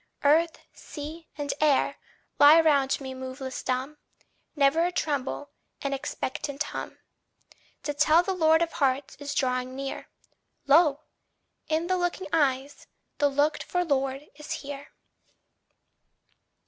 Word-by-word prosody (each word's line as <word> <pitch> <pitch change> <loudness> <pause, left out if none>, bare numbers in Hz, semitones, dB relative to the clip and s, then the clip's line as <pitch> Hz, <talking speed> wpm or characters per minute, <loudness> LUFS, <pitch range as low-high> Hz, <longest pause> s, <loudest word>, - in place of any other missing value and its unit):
Earth, 320 +3 +4 0.2
sea, 315 +2 -9
and 290 -1 -2
air 300 -3 +3 0.4
lie 300 +3 +9
round 280 -4 +3
me 265 -1 -6
moveless 260 0 -6
dumb, 260 +4 -3 0.6
Never 290 +3 +3
a 355 - +1
tremble, 290 -3 -2 0.3
an 275 0 -1
expectant 275 +1 -3
hum, - - -6 0.9
To 295 - -2
tell 310 +3 +4
the 385 - -1
Lord 320 -2 +4
of 335 - -3
Hearts 275 -2 0
is 285 0 -5
drawing 255 -1 -1
near: 275 0 -5 0.6
Lo! 290 0 +5 0.7
in 320 +1 0
the 370 +1 +1
looking 355 +1 -2
eyes, 280 -2 0 0.3
the 290 - +4
looked 290 +2 +1
for 355 0 -1
Lord 275 -1 -1
is 300 - -9
here. 285 0 -7
290 Hz, 125 wpm, -27 LUFS, 275-320 Hz, 0.9 s, lie